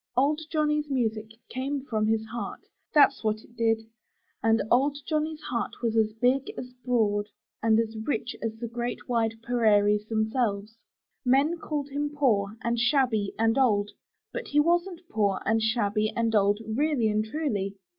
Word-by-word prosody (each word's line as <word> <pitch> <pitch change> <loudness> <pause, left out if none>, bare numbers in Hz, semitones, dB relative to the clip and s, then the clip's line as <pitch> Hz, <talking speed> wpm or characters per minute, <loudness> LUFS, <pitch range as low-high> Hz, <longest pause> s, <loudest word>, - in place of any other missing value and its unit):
Old 295 +4 +3
Johnny's 300 -1 +1
music 220 -5 -1 0.2
came 270 +2 -3
from 215 -4 0
his 220 0 +1
heart 235 +2 -6 0.2
— - - -49
that's 280 -3 +5
what 215 0 -1
it 235 - -20
did 225 -1 +1 0.3
— - - -45
and 225 0 +3
old 275 +4 +3
Johnny's 310 0 -1
heart 235 -2 -3
was 230 -1 0
as 220 -1 +3
big, 250 +4 +1
as 250 0 -7
broad, 210 -5 +1 0.3
and 225 0 +4
as 225 -1 -1
rich 225 +1 -3
as 225 -1 -3
the 235 +1 -5
great 240 +1 -4
wide 225 -2 +1
prairies 210 -3 +3
themselves. 220 -1 -1 0.5
Men 280 +6 +3
called 295 -3 -3
him 290 +1 -2
poor, 225 -8 +1
and 235 0 0
shabby, 245 -5 +2
and 225 +3 +2
old, 205 -5 +2 0.4
but 485 - -4
he 295 - +2
wasn't 345 +3 +1
poor, 200 - +1
and 225 +1 +2
shabby, 215 -1 +1
and 230 -1 0
old, 205 -1 +3
really 255 +1 +1
and 215 0 +1
truly. 215 -7 -2
230 Hz, 165 wpm, -27 LUFS, 220-275 Hz, 0.5 s, that's